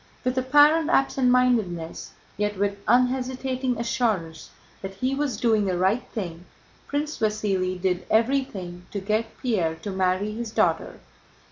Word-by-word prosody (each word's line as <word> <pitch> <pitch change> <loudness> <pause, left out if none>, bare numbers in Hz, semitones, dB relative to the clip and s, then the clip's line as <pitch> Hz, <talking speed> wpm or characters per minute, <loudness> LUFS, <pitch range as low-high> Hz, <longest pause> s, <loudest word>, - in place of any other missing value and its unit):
With 255 0 0
apparent 295 +5 +4
absent 270 -4 +2
mindedness, 225 -10 +1 0.2
yet 210 0 -2
with 200 0 -1
unhesitating 255 0 +1
assurance 210 -9 -1 0.3
that 195 0 -7
he 255 +7 -1
was 275 -5 -1
doing 220 -2 +2
the 185 -2 0
right 190 +7 +2
thing, 180 -5 -5 0.4
Prince 295 +1 -3
Vasíli 195 -4 0
did 180 0 -1
everything 220 -8 0
to 205 - -4
get 215 +3 -2
Pierre 185 -10 0
to 200 +5 -6
marry 190 +2 0
his 230 +1 -5
daughter. - - 0
215 Hz, 135 wpm, -25 LUFS, 190-255 Hz, 0.4 s, apparent